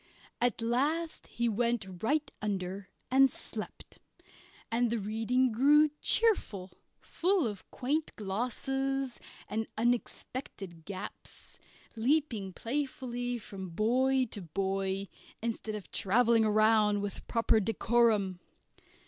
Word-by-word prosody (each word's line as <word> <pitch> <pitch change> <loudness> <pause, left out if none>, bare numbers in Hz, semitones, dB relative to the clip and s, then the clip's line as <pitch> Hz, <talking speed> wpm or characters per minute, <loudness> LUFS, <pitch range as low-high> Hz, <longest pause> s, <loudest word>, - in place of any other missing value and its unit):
At 240 -2 +1
last 295 +8 0
he 235 0 -1
went 220 -5 -1
right 295 +6 +1
under 195 -2 -3 0.2
and 270 +1 +6
slept, - - -8 0.7
and 235 +1 +2
the 235 - 0
reading 225 +5 +1
grew 295 +6 +5
cheerful, 210 - +2 0.3
full 365 -2 +1
of 205 -4 -5
quaint 300 +5 -2
glosses 260 +5 -2 0.3
and 220 +2 -2
unexpected 225 - -2
gaps, 195 -2 -9 0.4
leaping 230 -5 +1
playfully 245 +1 -3
from 195 -4 -8
boy 255 +8 +2
to 205 - -5
boy, 195 +2 -2 0.3
instead 225 -1 -3
of 210 - -8
travelling 225 +2 +3
round 215 -1 +4
with 205 - -4
a - - -13
proper 230 -1 +2
decorum. 220 -3 +2
230 Hz, 105 wpm, -31 LUFS, 200-255 Hz, 0.7 s, and